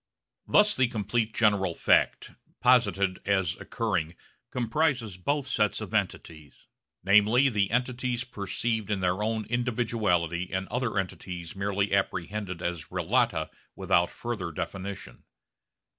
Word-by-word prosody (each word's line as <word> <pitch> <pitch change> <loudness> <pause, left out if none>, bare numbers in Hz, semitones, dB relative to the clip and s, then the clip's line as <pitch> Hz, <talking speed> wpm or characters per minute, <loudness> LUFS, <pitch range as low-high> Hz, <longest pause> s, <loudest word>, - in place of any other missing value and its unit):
Thus 210 0 +5
the 130 -1 +3
complete 110 0 -1
general 100 -6 +2
fact, - - +2 0.3
posited 100 -7 +3
as 95 -4 +1
occurring, 90 -9 -2 0.3
comprises 125 - 0
both 140 +10 -1
sets 105 -7 +1
of - - -7
entities, 75 -4 -3 0.4
namely 105 +7 +5
the 105 -5 +1
entities 125 0 -1
perceived 110 -1 -3
in 105 -2 0
their 90 +2 0
own 110 0 -1
individuality 110 -8 0
and 95 0 -2
other 120 -4 -1
entities 90 -2 -4
merely 100 0 -1
apprehended 95 -1 -2
as 85 -3 -3
relata 90 - 0 0.2
without 85 0 +2
further 105 -8 -4
definition. 95 -5 -6
105 Hz, 115 wpm, -28 LUFS, 90-120 Hz, 0.4 s, Thus